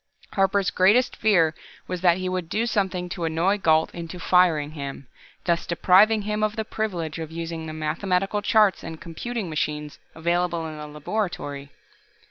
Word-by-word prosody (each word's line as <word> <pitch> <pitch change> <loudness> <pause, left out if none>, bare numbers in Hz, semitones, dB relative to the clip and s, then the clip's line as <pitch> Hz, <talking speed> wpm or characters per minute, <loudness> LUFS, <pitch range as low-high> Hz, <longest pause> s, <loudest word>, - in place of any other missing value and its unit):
Harper's 195 0 +2
greatest 205 +8 +4
fear 175 -7 +3 0.3
was 180 -1 -4
that 175 -1 +4
he 185 0 -3
would 185 -2 -3
do 225 +6 0
something 190 -5 -1
to 175 -1 -5
annoy 165 +5 +1
Gault 160 -5 +2
into 170 +1 -7
firing 170 -6 +3
him, 140 -3 -7 0.4
thus 170 -1 0
depriving 200 +5 +4
him 210 +1 -2
of 215 0 0
the 220 -1 -3
privilege 175 -9 -3
of 160 -1 -6
using 165 -1 -5
the 155 - -6
mathematical 180 +6 -1
charts 210 -1 +3
and 160 -1 -7
computing 215 +6 -5
machines 150 -1 -3 0.2
available 170 0 0
in 155 -1 -6
the 150 - -7
laboratory. 150 -3 -4
175 Hz, 160 wpm, -24 LUFS, 160-200 Hz, 0.4 s, greatest